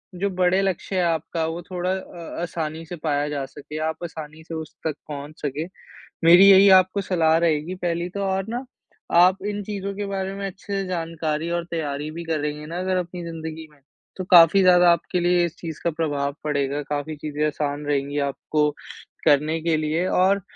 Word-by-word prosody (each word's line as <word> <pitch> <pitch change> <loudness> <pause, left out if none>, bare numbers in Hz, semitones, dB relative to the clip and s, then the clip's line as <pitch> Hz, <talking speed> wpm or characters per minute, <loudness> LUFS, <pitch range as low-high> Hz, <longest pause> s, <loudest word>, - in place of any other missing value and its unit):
जो 200 +3 -1
बड़े 185 0 +2
लक्ष्य 190 0 -2
है 185 - +2
आपका, 165 -1 -1
वो 165 +2 -4
थोड़ा 180 +1 -3
अ, 175 -4 -6
आसानी 165 -2 -4
से 175 - -7
पाया 145 -2 0
जा 140 -2 -3
सके, 145 +2 -9
आप 160 +2 -3
आसानी 160 -1 -8
से 165 - -9
उस 160 -1 -6
तक 155 - -2
पहुँच 150 +1 -8
सकें। 150 +3 -3 0.6
मेरी 175 +4 +8
यही 195 +1 +8
आपको 185 +2 -1
सलाह 165 -4 +2
रहेगी 165 +1 0
पहली 175 -1 -2
तो 200 +2 -4
और 190 0 -1
ना 245 +3 -4 0.5
आप 185 +2 +6
इन 205 0 -3
चीज़ों 200 -1 -4
के 205 +1 -3
बारे 195 -1 -3
में 200 0 -4
अच्छे 195 +1 -8
से 195 -1 -1
जानकारी 165 -2 -2
और 170 0 -1
तैयारी 150 -3 -3
भी 170 +2 -6
करेंगे 150 -2 -2
ना 170 +3 -5
अगर 185 0 0
अपनी 175 0 -4
ज़िंदगी 160 -1 -7
में, 150 - -23 0.4
तो 185 - -3
काफ़ी 175 +2 +8
ज़्यादा 180 -1 +6
आपके 170 +1 0
लिए 175 0 +3
इस 170 - -6
चीज़ 160 -3 -7
का - - +2
प्रभाव 145 -3 -2
पड़ेगा। 145 -1 -1
काफ़ी 145 +2 -4
चीज़ें 150 0 -2
आसान 145 0 -3
रहेंगी 145 0 -1
आपको 150 +2 0 0.6
करने 150 +2 +3
के 165 0 +1
लिए। 155 +3 0
और 190 +2 +3
165 Hz, 195 wpm, -23 LUFS, 150-185 Hz, 0.6 s, मेरी